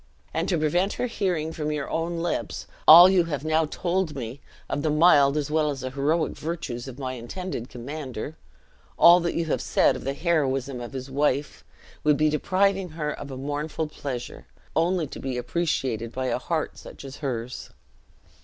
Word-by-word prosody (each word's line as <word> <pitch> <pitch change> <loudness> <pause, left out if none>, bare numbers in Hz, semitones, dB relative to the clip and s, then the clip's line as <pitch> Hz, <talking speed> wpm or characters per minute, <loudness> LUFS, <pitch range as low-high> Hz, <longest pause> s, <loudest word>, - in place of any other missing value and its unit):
And 165 +3 -1
to 175 - +2
prevent 175 +6 +1
her - - -2
hearing 180 -9 -1
from 150 -1 -2
your 150 -2 -3
own 165 +1 -2
lips 175 - -3 0.2
all 170 +3 +11
you 185 -2 +4
have 150 -3 -4
now 160 0 +2
told 175 0 -1
me 125 +1 -6 0.3
of 145 - -2
the 155 - 0
mild 150 -2 +5
as 150 -1 -2
well 155 -1 +2
as 140 -2 -4
heroic 140 +5 0
virtues 135 -7 -5
of 130 -2 -8
my 130 -2 -4
intended 125 +1 -6
commander 135 +2 -6 0.6
all 170 0 +7
you 170 - -1
have 155 - -1
said - - +3
of - - -7
the 135 +1 -2
heroism 140 -6 0
of 120 - -7
his 130 0 -6
wife 145 0 0 0.4
would 150 -1 +4
be 155 0 +3
depriving 190 +4 +1
her 155 -2 -3
of 145 - -7
a 130 - -6
mournful 145 +3 -3
pleasure, 135 -5 -6 0.3
only 170 +1 +2
to - - -9
be 130 -2 -3
appreciated 125 -4 -1
by 130 +1 -3
a 125 -1 0
heart 160 +3 -3
such - - -11
as 135 +1 -8
hers." 125 -4 -4
150 Hz, 180 wpm, -25 LUFS, 135-165 Hz, 0.6 s, all